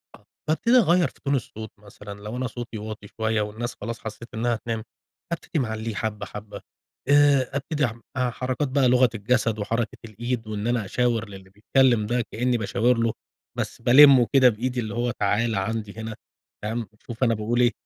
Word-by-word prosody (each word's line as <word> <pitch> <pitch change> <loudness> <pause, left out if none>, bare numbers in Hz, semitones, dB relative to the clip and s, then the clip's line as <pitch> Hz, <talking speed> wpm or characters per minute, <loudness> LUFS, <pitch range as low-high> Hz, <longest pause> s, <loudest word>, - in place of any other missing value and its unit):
آه - - -23 0.2
بابتدي 230 +10 +4
اغير 175 - +4
في - - -17
تون 140 0 +2
الصوت 110 -3 -5
مثلًا 100 0 -11
لو 105 +4 -6
أنا 130 0 -1
صوتي 120 -1 -7
واطي 105 -1 -7
شويّة، 110 +1 -1
والناس 110 +3 -4
خلاص 115 0 -4
حسّيت 110 +2 -9
إنّها 120 +2 0
هتنام 115 0 -4 0.5
ابتدي 170 -2 -2
معليه 110 -2 -3
حبّة 110 -1 -3
حبّة، 105 0 -9 0.5
آآ 145 -3 +5
ابتدي 140 -1 0
ح 115 - -6 0.2
حركات 125 +2 -1
بقى 130 -1 +2
لغة 125 -1 +5
الجسد 110 0 0
وحركة 115 +3 -2
الإيد 115 +1 -4
وإن 105 +1 -3
أنا 120 -4 0
أشاور 115 0 0
للي 95 -1 -12
بيتكلّم 115 +3 +2
ده 120 +3 0
كأني 125 +2 +1
باشاور 115 +2 +1
له، 115 -1 +1 0.4
بس - - -4
بالمه 130 0 +8
كده 130 -2 +7
بإيدي 125 +3 -2
اللي 110 -3 -3
هو 120 +1 0
تعالَ 110 +3 0
عندي 105 +1 -2
هنا 110 0 -5 0.5
فاهم، 110 +1 -3 0.2
شوف 120 +2 -3
أنا 115 -2 +4
باقول 115 +3 -1
إيه، 120 0 +4
115 Hz, 180 wpm, -25 LUFS, 110-125 Hz, 0.5 s, بالمه